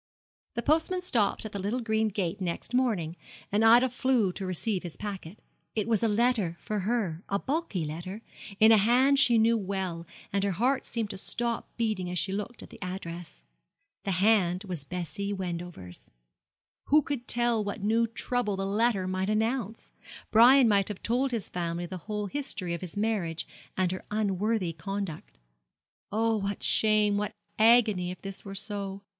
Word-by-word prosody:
The 235 Hz, -, -2 dB
postman 325 Hz, +4 st, +2 dB
stopped 225 Hz, -, +1 dB
at 215 Hz, -, -5 dB
the 200 Hz, -, -4 dB
little 210 Hz, +6 st, -1 dB
green 220 Hz, -2 st, +1 dB
gate 195 Hz, -2 st, -2 dB
next 175 Hz, +6 st, -3 dB
morning, 210 Hz, -11 st, +1 dB, 0.4 s
and 210 Hz, +2 st, +2 dB
Ida 235 Hz, +3 st, +7 dB
flew 250 Hz, -5 st, +1 dB
to 190 Hz, 0 st, -5 dB
receive 185 Hz, +2 st, -1 dB
his 175 Hz, -3 st, -8 dB
packet. 200 Hz, -3 st, -6 dB, 0.4 s
It 215 Hz, -1 st, 0 dB
was 225 Hz, -2 st, +2 dB
a 230 Hz, -, +3 dB
letter 215 Hz, -5 st, +1 dB
for 210 Hz, -1 st, -3 dB
her 195 Hz, -5 st, -1 dB
a 200 Hz, -, +1 dB
bulky 265 Hz, -, -2 dB
letter 180 Hz, +8 st, -6 dB, 0.4 s
in 220 Hz, +1 st, +7 dB
a 220 Hz, -, +7 dB
hand 255 Hz, +6 st, +4 dB
she 240 Hz, -3 st, +5 dB
knew 225 Hz, +1 st, +4 dB
well, 190 Hz, -4 st, -3 dB, 0.3 s
and 200 Hz, -1 st, +1 dB
her 200 Hz, -1 st, +1 dB
heart 255 Hz, +8 st, +1 dB
seemed 225 Hz, -3 st, -2 dB
to 195 Hz, -, -7 dB
stop 235 Hz, +3 st, -3 dB
beating 215 Hz, -6 st, -1 dB
as 180 Hz, -, -3 dB
she 190 Hz, -, -1 dB
looked 210 Hz, +4 st, -4 dB
at -, -, -13 dB
the -, -, -13 dB
address. 175 Hz, -, -7 dB, 0.6 s
The 195 Hz, -, -1 dB
hand 185 Hz, -1 st, +3 dB
was 180 Hz, -7 st, -4 dB
Bessie 180 Hz, +5 st, -4 dB
Wendover's. 175 Hz, -, -6 dB, 0.8 s
Who 300 Hz, +1 st, +5 dB
could 260 Hz, -4 st, -4 dB
tell 240 Hz, -2 st, +1 dB
what 205 Hz, 0 st, -5 dB
new 225 Hz, +2 st, +3 dB
trouble 230 Hz, -2 st, -1 dB
the 195 Hz, -, -2 dB
letter 205 Hz, -1 st, +1 dB
might 185 Hz, +1 st, -1 dB
announce? 225 Hz, 0 st, -1 dB, 0.4 s
Brian 245 Hz, +3 st, +7 dB
might 200 Hz, -3 st, +3 dB
have 210 Hz, -3 st, -7 dB
told 250 Hz, +4 st, +1 dB
his 230 Hz, -6 st, -3 dB
family 170 Hz, 0 st, -3 dB
the 185 Hz, +2 st, -6 dB
whole 210 Hz, -1 st, -1 dB
history 205 Hz, -7 st, -4 dB
of 170 Hz, -, -4 dB
his 185 Hz, 0 st, -7 dB
marriage 195 Hz, -7 st, -1 dB, 0.3 s
and 185 Hz, -2 st, +2 dB
her 185 Hz, -, -5 dB
unworthy 210 Hz, -2 st, 0 dB
conduct. 190 Hz, +1 st, -5 dB, 0.7 s
Oh, 225 Hz, +1 st, +2 dB
what 200 Hz, -1 st, -3 dB
shame, 215 Hz, -1 st, +3 dB
what 210 Hz, 0 st, -2 dB, 0.2 s
agony, 220 Hz, -5 st, +5 dB
if 180 Hz, -, -6 dB
this 195 Hz, -1 st, -7 dB
were 195 Hz, -1 st, -7 dB
so! 200 Hz, -1 st, -5 dB
205 Hz, 175 wpm, -28 LUFS, 185-230 Hz, 0.8 s, Ida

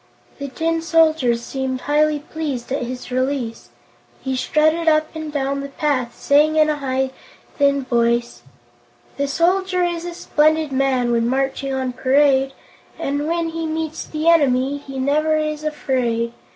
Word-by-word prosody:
The 280 Hz, -, -4 dB
Tin 325 Hz, +4 st, -1 dB
Soldier 320 Hz, -7 st, +3 dB
seemed 260 Hz, +2 st, -4 dB
highly 300 Hz, +1 st, +2 dB
pleased 290 Hz, -4 st, -5 dB
at 275 Hz, -, -1 dB
his 250 Hz, +1 st, -6 dB
release. 255 Hz, -2 st, -2 dB, 0.5 s
He 265 Hz, -1 st, -3 dB
strutted 310 Hz, +5 st, +1 dB
up 310 Hz, -1 st, +3 dB
and 315 Hz, -1 st, -6 dB
down 275 Hz, -1 st, -1 dB
the 280 Hz, -, -6 dB
path, 270 Hz, -4 st, -2 dB
saying 300 Hz, +2 st, +3 dB
in 310 Hz, 0 st, +4 dB
a 300 Hz, -, -2 dB
high, 265 Hz, -1 st, -1 dB, 0.5 s
thin 280 Hz, -1 st, +3 dB
voice: 235 Hz, -1 st, 0 dB, 0.8 s
"The 280 Hz, 0 st, 0 dB
Soldier 365 Hz, +5 st, +1 dB
is 345 Hz, -1 st, -2 dB
a 350 Hz, -1 st, -6 dB
splendid 310 Hz, -1 st, +1 dB
man 260 Hz, -2 st, +1 dB
When 235 Hz, 0 st, +1 dB
marching 270 Hz, +1 st, -1 dB
on 260 Hz, -1 st, -2 dB
parade, 270 Hz, +1 st, +3 dB, 0.4 s
And 285 Hz, +2 st, -2 dB
when 335 Hz, 0 st, 0 dB
he 325 Hz, 0 st, -4 dB
meets 315 Hz, 0 st, -3 dB
the 310 Hz, +1 st, -4 dB
enemy 280 Hz, -4 st, +3 dB
He 275 Hz, -1 st, -9 dB
never 305 Hz, +4 st, +1 dB
is 305 Hz, 0 st, -2 dB
afraid. 250 Hz, -6 st, -1 dB
280 Hz, 150 wpm, -20 LUFS, 260-310 Hz, 0.8 s, in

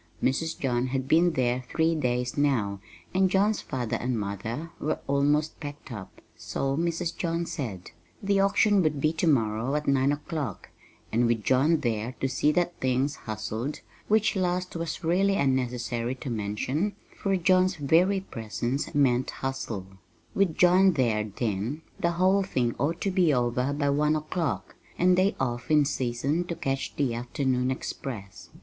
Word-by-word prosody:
Mrs. 160 Hz, +5 st, 0 dB
John 125 Hz, -1 st, 0 dB
had 130 Hz, 0 st, -2 dB
been 170 Hz, +3 st, +4 dB
there 125 Hz, -1 st, 0 dB
three 160 Hz, 0 st, +2 dB
days 125 Hz, -5 st, -1 dB
now, 120 Hz, -9 st, +1 dB, 0.3 s
and 190 Hz, 0 st, +3 dB
John's 205 Hz, +3 st, +2 dB
father 125 Hz, -5 st, -2 dB
and 125 Hz, -2 st, -1 dB
mother 110 Hz, -, -4 dB
were 155 Hz, -, -1 dB
almost 145 Hz, +2 st, +1 dB
packed 145 Hz, -2 st, -8 dB
up 105 Hz, -5 st, -9 dB
so 135 Hz, 0 st, -2 dB
Mrs. 170 Hz, +1 st, -1 dB
John 170 Hz, -1 st, -1 dB
said. 110 Hz, -, -5 dB, 0.3 s
The 200 Hz, 0 st, +2 dB
auction 200 Hz, +1 st, +4 dB
would 155 Hz, -4 st, +1 dB
be 155 Hz, +3 st, +2 dB
to 165 Hz, +1 st, 0 dB
morrow 115 Hz, -1 st, +1 dB
at 150 Hz, 0 st, -2 dB
nine 140 Hz, 0 st, +3 dB
o'clock, 145 Hz, -, -4 dB, 0.4 s
and 120 Hz, +2 st, +3 dB
with 115 Hz, -2 st, 0 dB
John 145 Hz, +7 st, +3 dB
there 115 Hz, +1 st, -2 dB
to 135 Hz, -, +1 dB
see 135 Hz, +3 st, +2 dB
that 175 Hz, +1 st, 0 dB
things 130 Hz, +2 st, +1 dB
"hustled" 110 Hz, +5 st, -4 dB, 0.3 s
which 215 Hz, 0 st, +3 dB
last 180 Hz, -1 st, -1 dB
was 165 Hz, +1 st, -4 dB
really 190 Hz, +4 st, +2 dB
unnecessary 125 Hz, -3 st, 0 dB
to 130 Hz, 0 st, -6 dB
mention, 115 Hz, -, -1 dB, 0.2 s
for 195 Hz, -1 st, 0 dB
John's 185 Hz, +1 st, +3 dB
very 175 Hz, +6 st, +3 dB
presence 120 Hz, -, -4 dB
meant 130 Hz, -3 st, +3 dB
"hustle" 130 Hz, -7 st, -4 dB, 0.5 s
with 190 Hz, -5 st, +1 dB
John 185 Hz, +1 st, +6 dB
there, 115 Hz, -7 st, +1 dB
then, 110 Hz, +7 st, -3 dB, 0.2 s
the 170 Hz, 0 st, +1 dB
whole 185 Hz, +3 st, +3 dB
thing 125 Hz, -11 st, 0 dB
ought 160 Hz, +6 st, 0 dB
to 195 Hz, -, 0 dB
be 180 Hz, -4 st, +3 dB
over 125 Hz, +1 st, +1 dB
by 145 Hz, 0 st, +1 dB
one 150 Hz, +2 st, +2 dB
o'clock, 155 Hz, +2 st, -2 dB, 0.2 s
and 180 Hz, +1 st, +4 dB
they 190 Hz, +2 st, +2 dB
off 120 Hz, +1 st, -2 dB
in 150 Hz, -2 st, +5 dB
season 135 Hz, +4 st, -1 dB
to 170 Hz, -, -4 dB
'catch 135 Hz, -4 st, -3 dB
the 135 Hz, -5 st, 0 dB
afternoon 125 Hz, +1 st, -1 dB
express. 120 Hz, -6 st, -6 dB
140 Hz, 160 wpm, -27 LUFS, 120-170 Hz, 0.5 s, John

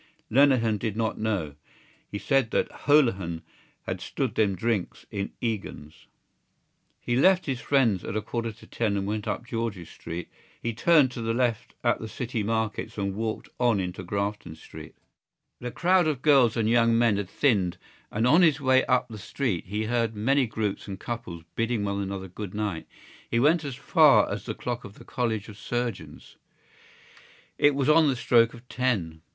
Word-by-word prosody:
Lenehan 120 Hz, -5 st, +4 dB
did 110 Hz, 0 st, -3 dB
not 115 Hz, -1 st, -1 dB
know: 100 Hz, -9 st, -1 dB, 0.6 s
he 100 Hz, -, -4 dB
said 135 Hz, +1 st, +1 dB
that -, -, 0 dB
Holohan 100 Hz, -, +2 dB, 0.4 s
had -, -, -4 dB
stood -, -, -2 dB
them 100 Hz, -3 st, +1 dB
drinks 105 Hz, 0 st, -2 dB
in 100 Hz, 0 st, -3 dB
Egan's. 100 Hz, -9 st, -5 dB, 0.9 s
He 120 Hz, -, -2 dB
left 185 Hz, +8 st, +4 dB
his 130 Hz, -4 st, -3 dB
friends 120 Hz, -10 st, +2 dB
at -, -, -5 dB
a 110 Hz, -, 0 dB
quarter 115 Hz, +1 st, -3 dB
to -, -, -16 dB
ten 105 Hz, -4 st, -1 dB
and 100 Hz, -, -2 dB
went 105 Hz, +1 st, -3 dB
up -, -, -3 dB
George's 115 Hz, -8 st, -4 dB
Street. 85 Hz, 0 st, -7 dB, 0.3 s
He 115 Hz, -, -3 dB
turned 145 Hz, +2 st, +4 dB
to 120 Hz, -, -6 dB
the 115 Hz, 0 st, -1 dB
left 120 Hz, -3 st, -1 dB
at -, -, +2 dB
the 110 Hz, -, -6 dB
City 120 Hz, +1 st, -4 dB
Markets 110 Hz, +1 st, -2 dB
and 100 Hz, -1 st, -1 dB
walked 110 Hz, +2 st, -3 dB
on 120 Hz, -4 st, +3 dB
into 90 Hz, 0 st, -4 dB
Grafton 100 Hz, -2 st, -3 dB
Street. 80 Hz, -, -12 dB, 0.6 s
The 125 Hz, -, -4 dB
crowd 180 Hz, +5 st, +2 dB
of 140 Hz, -5 st, -2 dB
girls 135 Hz, -6 st, +5 dB
and 110 Hz, -2 st, +1 dB
young 115 Hz, 0 st, +4 dB
men 115 Hz, -3 st, +3 dB
had 100 Hz, -3 st, -3 dB
thinned 100 Hz, -11 st, +1 dB, 0.3 s
and 110 Hz, +3 st, 0 dB
on 155 Hz, +8 st, +6 dB
his 160 Hz, -4 st, +4 dB
way 130 Hz, -1 st, +4 dB
up 125 Hz, -1 st, +2 dB
the 110 Hz, -3 st, -9 dB
street 100 Hz, -, -3 dB
he 105 Hz, +3 st, -2 dB
heard 115 Hz, -1 st, 0 dB
many 130 Hz, +5 st, +2 dB
groups 110 Hz, -2 st, -3 dB
and 95 Hz, -1 st, -6 dB
couples 115 Hz, -9 st, -6 dB
bidding 115 Hz, -2 st, 0 dB
one 100 Hz, 0 st, -2 dB
another 95 Hz, -1 st, -4 dB
good 95 Hz, +2 st, -7 dB
night. 105 Hz, -6 st, -3 dB, 0.4 s
He 115 Hz, -, +1 dB
went 155 Hz, +5 st, +3 dB
as 140 Hz, -3 st, -5 dB
far -, -, +5 dB
as -, -, -4 dB
the -, -, -3 dB
clock 120 Hz, 0 st, -4 dB
of 100 Hz, 0 st, -11 dB
the -, -, -14 dB
College 115 Hz, -5 st, -2 dB
of 105 Hz, -1 st, -11 dB
Surgeons: 120 Hz, -3 st, -5 dB, 1.2 s
it 145 Hz, -1 st, +4 dB
was 140 Hz, -1 st, 0 dB
on 155 Hz, +1 st, +6 dB
the 135 Hz, -, +2 dB
stroke 115 Hz, -1 st, +3 dB
of 120 Hz, +1 st, -15 dB
ten. 100 Hz, -13 st, -1 dB
115 Hz, 180 wpm, -26 LUFS, 100-125 Hz, 1.2 s, on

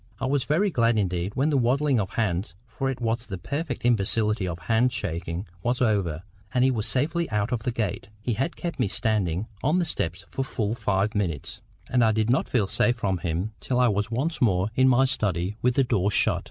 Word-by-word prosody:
I -, -, -2 dB
was 135 Hz, 0 st, +1 dB
very 185 Hz, +7 st, +2 dB
glad 115 Hz, -5 st, +2 dB
indeed 90 Hz, -1 st, -1 dB
when 145 Hz, +4 st, +2 dB
the 140 Hz, -, +3 dB
waddling 130 Hz, +2 st, +2 dB
of 95 Hz, -3 st, -1 dB
hands—for 110 Hz, +5 st, -2 dB
it 135 Hz, -, -3 dB
was 115 Hz, 0 st, -1 dB
the 95 Hz, -4 st, -5 dB
perfect 140 Hz, -, -4 dB
imbecility 105 Hz, -3 st, +2 dB
of 85 Hz, -2 st, -3 dB
hand 115 Hz, +9 st, +2 dB
shaking—was 90 Hz, +2 st, -3 dB
over, 100 Hz, -9 st, +1 dB, 0.3 s
and 125 Hz, -, +2 dB
he 130 Hz, -, +4 dB
was 110 Hz, -4 st, -2 dB
safely 160 Hz, +6 st, 0 dB
out 105 Hz, +2 st, -1 dB
of 125 Hz, -, 0 dB
the 115 Hz, +3 st, -2 dB
gate. 105 Hz, -4 st, -3 dB
He 115 Hz, +3 st, -2 dB
had 135 Hz, +10 st, -2 dB
kept 170 Hz, -1 st, -5 dB
me -, -, +2 dB
standing 100 Hz, -4 st, 0 dB, 0.2 s
on 150 Hz, +6 st, +2 dB
the 180 Hz, -, +1 dB
steps 90 Hz, -, -3 dB
for 135 Hz, -, -3 dB
full 110 Hz, -5 st, -2 dB
five 100 Hz, -2 st, 0 dB
minutes, 90 Hz, -9 st, -3 dB, 0.3 s
and 125 Hz, -1 st, +2 dB
I 110 Hz, -1 st, +4 dB
did 110 Hz, +1 st, +1 dB
not 130 Hz, -, +1 dB
feel 115 Hz, -6 st, +2 dB
safe 120 Hz, +5 st, +2 dB
from 95 Hz, -6 st, -1 dB
him 85 Hz, +6 st, -2 dB
till 125 Hz, -1 st, -1 dB
I 125 Hz, -1 st, +5 dB
was 105 Hz, +1 st, 0 dB
once 140 Hz, +8 st, -2 dB
more 100 Hz, -3 st, +2 dB
in 130 Hz, +2 st, +4 dB
my 130 Hz, +1 st, +5 dB
study 100 Hz, -6 st, -1 dB
with 125 Hz, 0 st, +2 dB
the 135 Hz, -, +4 dB
door 105 Hz, -6 st, +1 dB
shut. 105 Hz, -, +3 dB
115 Hz, 215 wpm, -25 LUFS, 95-125 Hz, 0.3 s, I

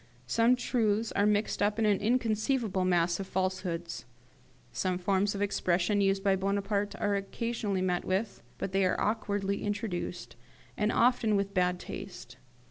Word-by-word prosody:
Some 230 Hz, -, +3 dB
truths 225 Hz, -3 st, 0 dB
are 205 Hz, -, +2 dB
mixed 210 Hz, 0 st, +1 dB
up 205 Hz, +1 st, +2 dB
with 225 Hz, -, +2 dB
an 205 Hz, -2 st, +3 dB
inconceivable 225 Hz, -2 st, +1 dB
mass 175 Hz, -1 st, +2 dB
of 195 Hz, -, -4 dB
falsehoods. 185 Hz, -5 st, -3 dB, 0.7 s
Some 180 Hz, +9 st, -1 dB
forms 195 Hz, +2 st, +1 dB
of 200 Hz, -, -1 dB
expression 195 Hz, 0 st, +1 dB
used 195 Hz, 0 st, +1 dB
by 195 Hz, -1 st, +3 dB
Bonaparte 200 Hz, +1 st, -1 dB
are 205 Hz, -1 st, +1 dB
occasionally 200 Hz, -1 st, -2 dB
met 180 Hz, -1 st, 0 dB
with, 195 Hz, +3 st, -2 dB, 0.2 s
but 195 Hz, -, -4 dB
they 195 Hz, 0 st, +2 dB
are 185 Hz, -, +1 dB
awkwardly 205 Hz, -2 st, -1 dB
introduced, 205 Hz, -3 st, -4 dB, 0.4 s
and 210 Hz, +1 st, +1 dB
often 235 Hz, -3 st, +3 dB
with 200 Hz, 0 st, -1 dB
bad 180 Hz, -1 st, +2 dB
taste. 180 Hz, -13 st, -8 dB
200 Hz, 150 wpm, -30 LUFS, 185-210 Hz, 0.7 s, Some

